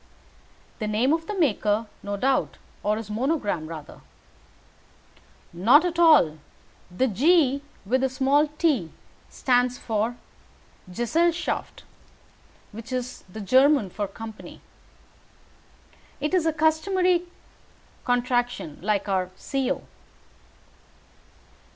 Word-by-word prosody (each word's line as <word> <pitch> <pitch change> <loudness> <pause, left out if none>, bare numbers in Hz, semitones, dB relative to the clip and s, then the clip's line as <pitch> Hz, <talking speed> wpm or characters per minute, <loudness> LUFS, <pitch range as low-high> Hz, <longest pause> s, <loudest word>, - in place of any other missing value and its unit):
"The 215 - -2
name 230 +7 +2
of 325 0 -2
the 420 - -4
maker, 220 - +1 0.2
no 205 0 -4
doubt; 265 +5 0 0.2
or 210 +1 0
his 220 -2 -7
monogram, 215 - -1
rather." 155 -2 -9 1.5
"Not 290 - +4
all. 300 - +5 0.5
The 180 +9 0
G 280 - +3 0.2
with 255 +6 +1
the 265 - +1
small 275 +3 +2
t 295 - 0 0.4
stands 250 -1 +1
for 225 +2 -2 0.7
'Gesellschaft,' 330 - -1 0.9
which 230 +4 -10
is 255 0 -4
the 220 - -7
German 260 -1 +4
for 205 +1 -3
'Company.' 220 +2 -10 1.6
It 300 +4 -2
is 350 -3 +2
a 320 - +1
customary 360 +2 +2 0.8
contraction 245 - -1
like 205 +1 0
our 185 -2 0
'Co.' 270 -1 -2
250 Hz, 100 wpm, -25 LUFS, 210-300 Hz, 1.6 s, all